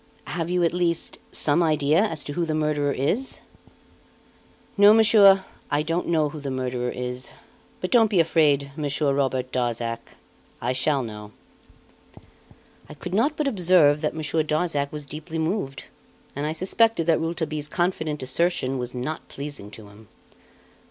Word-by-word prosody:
"Have 170 -1 -3
you, 180 0 +1
at 170 - +2
least, 170 -2 -1
some 150 +3 +2
idea 155 -1 +2
as 165 -9 -2
to 145 - -6
who 175 - -1
the 160 -2 -1
murderer 150 -2 0
is?" 185 - -1 1.4
"No, 205 +1 +7
monsieur, 200 -3 +6 0.2
I 145 +1 +1
don't 165 +3 -2
know 155 -3 +2
who 150 - -8
the 140 -1 -5
murderer 125 -1 -2
is; 125 0 -5 0.5
but 185 - -3
don't 225 -3 +5
be 195 -4 +2
afraid, 150 -4 +2
Monsieur 145 -1 0
Robert 130 -2 -1
Darzac 120 -2 -2 0.6
I - - -1
shall 135 +1 +1
know." 105 -2 -9 1.6
I 150 - -9
could 180 +4 -7
not 275 +9 +1
but 300 - 0
observe 175 - +4
that 150 - -1
Monsieur 155 0 -1
Darzac 150 -2 -1
was 150 -1 -6
deeply 155 +3 -7
moved; 160 -4 -2 0.5
and 145 +2 -2
I - - -1
suspected 185 +3 +1
that 165 -1 +3
Rouletabille's 160 -2 -3
confident 160 -4 -2
assertion 135 -1 0
was 125 0 -5
not 140 +6 -5
pleasing 140 -7 -7
to 105 0 -12
him. 105 +1 -17
155 Hz, 155 wpm, -24 LUFS, 135-175 Hz, 1.6 s, No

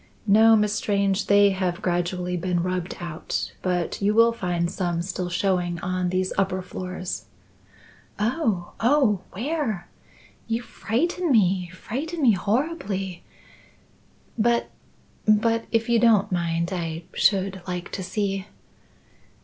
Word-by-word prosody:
"No, 220 +2 +6
Miss 210 -1 +2
Strange; 200 -2 0
they 200 0 +6
have 185 0 -2
gradually 180 0 -1
been 175 -1 0
rubbed 180 0 -3
out, 170 -3 -4
but 180 -1 -1
you 205 +2 +2
will 230 +1 +6
find 175 -5 -1
some 175 -3 -1
still 180 0 -3
showing 175 -1 0
on 185 -1 -1
these 185 +1 0
upper 190 -1 0
floors." 185 0 -5 0.9
"Oh! 215 - 0
oh! 235 -6 +3
where? 240 - -2 0.6
You 230 +1 -1
frighten 330 - -1
me 185 -6 +3
frighten 290 - -4
me 245 - +7
horribly! 200 - -1 1.2
But 235 +2 +2 0.6
but 225 +2 +3
if 230 -1 +1
you 235 -1 +3
don't 215 -4 +4
mind, 170 0 -1
I 165 -2 -3
should 195 -1 +2
like 180 0 -4
to - - -4
see." 195 0 -2
195 Hz, 125 wpm, -24 LUFS, 180-225 Hz, 1.2 s, me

